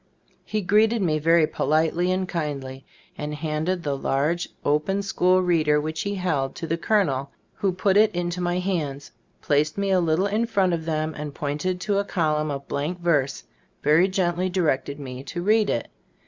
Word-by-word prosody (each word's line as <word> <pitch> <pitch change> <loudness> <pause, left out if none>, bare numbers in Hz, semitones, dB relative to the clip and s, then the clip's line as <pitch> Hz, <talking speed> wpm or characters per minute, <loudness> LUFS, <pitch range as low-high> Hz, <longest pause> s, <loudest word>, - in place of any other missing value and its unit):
He 215 0 -2
greeted 215 +4 +3
me 155 -3 +1
very 165 +1 +4
politely 160 +4 +1
and 185 0 0
kindly, 140 -6 -4 0.4
and 150 0 -3
handed 160 +4 -2
the 145 -2 -1
large, 145 +6 0 0.2
open 155 +7 +1
school 185 -1 +2
reader 155 -4 +3
which 155 +1 -3
he 200 0 -2
held, 160 -8 -1
to - - -5
the 165 +1 0
colonel, 160 -8 +1 0.2
who 195 - 0
put 190 +2 +2
it 215 0 +6
into 175 0 -2
my 175 0 0
hands, 155 -7 -3 0.3
placed 150 +3 +1
me 200 -1 0
a 185 - +4
little 170 +2 +1
in 215 +3 0
front 190 -5 +2
of 160 -1 -2
them, 155 -1 -1
and 150 -1 -6
pointing 150 +6 -2
to 200 +2 0
a - - +1
column 155 -6 0
of 140 -1 -5
blank 155 +6 -3
verse, 145 -6 0 0.4
very 155 +5 +5
gently 185 -1 0
directed 150 -5 0
me 130 -2 -7
to 175 +4 -5
read 215 +1 +3
it. 115 - -1
170 Hz, 180 wpm, -24 LUFS, 150-185 Hz, 0.4 s, it